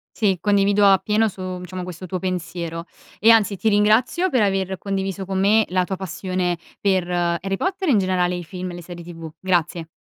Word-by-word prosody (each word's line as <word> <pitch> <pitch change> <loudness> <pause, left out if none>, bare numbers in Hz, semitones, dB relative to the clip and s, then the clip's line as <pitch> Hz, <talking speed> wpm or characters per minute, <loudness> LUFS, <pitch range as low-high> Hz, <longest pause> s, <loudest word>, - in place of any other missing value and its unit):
Sì, 195 -4 +1
condivido 205 0 +3
appieno 210 +3 +3
su, 190 - -14
mhmm, 185 -1 -5
diciamo 180 0 -6
questo 180 0 -8
tuo 185 +1 -4
pensiero, 170 -2 -4 0.3
e 225 - +5
anzi 215 -3 +4
ti 220 +4 +1
ringrazio 220 - +3
per 255 -6 +2
aver 195 -2 0
condiviso 195 0 -3
con 190 0 -2
me 210 +3 +4
la 185 0 +1
tua 190 - -3
passione 185 -1 -2 0.2
per 185 -3 +1
Harry 175 +2 0
Potter, 375 - -2
e - - +4
in 225 - +4
generale 180 -2 +1
i 175 - -5
film 180 +2 -6
e - - -9
le 175 - -8
serie 175 0 -9
TV. 165 -2 -8
Grazie. 175 -3 0
190 Hz, 205 wpm, -22 LUFS, 180-205 Hz, 0.3 s, e